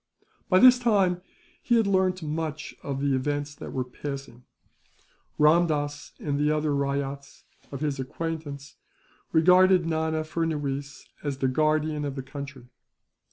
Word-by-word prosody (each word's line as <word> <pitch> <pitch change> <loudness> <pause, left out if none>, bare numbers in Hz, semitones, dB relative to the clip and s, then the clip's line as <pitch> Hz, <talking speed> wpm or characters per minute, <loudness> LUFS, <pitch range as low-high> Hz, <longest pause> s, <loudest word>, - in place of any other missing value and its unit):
By 185 - +5
this 250 +4 +8
time, 195 -7 +2 0.4
he 240 - +2
had 225 - +3
learnt 185 -2 +1
much 155 0 -4
of 140 -1 -4
the 140 -1 +1
events 145 +2 -1
that - - -9
were 130 - -1
passing. 135 -1 -8 0.9
Ramdass 150 -2 +2
and 145 -1 -2
the 150 0 +2
other 150 -1 +1
ryots 140 0 -3 0.3
of 140 0 -6
his 145 -3 -1
acquaintance 145 0 -5 0.5
regarded 180 +2 +5
Nana 160 -1 0
Furnuwees 145 -4 -3 0.2
as 145 -3 -2
the 135 - +1
guardian 155 +2 +1
of 140 -2 -3
the 135 - -5
country. 135 -2 -8
150 Hz, 135 wpm, -26 LUFS, 140-165 Hz, 0.9 s, this